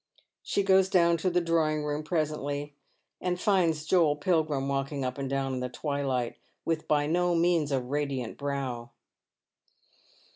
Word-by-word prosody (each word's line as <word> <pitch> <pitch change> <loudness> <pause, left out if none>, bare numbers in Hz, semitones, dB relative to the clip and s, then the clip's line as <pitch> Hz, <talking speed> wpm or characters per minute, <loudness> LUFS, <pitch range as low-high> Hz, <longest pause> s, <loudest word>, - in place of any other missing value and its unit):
She 200 - 0
goes 190 -1 +4
down 170 -3 +4
to 185 +3 0
the 180 0 +2
drawing 160 -2 +1
room 150 0 -2
presently, 150 -2 -2 0.5
and 180 -1 -1
finds 170 -6 +2
Joel 160 -3 +3
Pilgrim 150 -3 0
walking 140 0 -2
up 125 +2 -3
and 135 -1 -3
down 135 -1 -1
in 130 - -2
the 125 0 -3
twilight, 135 -3 -2 0.3
with 165 -1 -1
by 145 -1 +2
no 175 +3 +1
means 165 -3 +2
a 135 - +2
radiant 135 -2 -3
brow. 135 -4 -4
150 Hz, 150 wpm, -28 LUFS, 135-170 Hz, 0.5 s, goes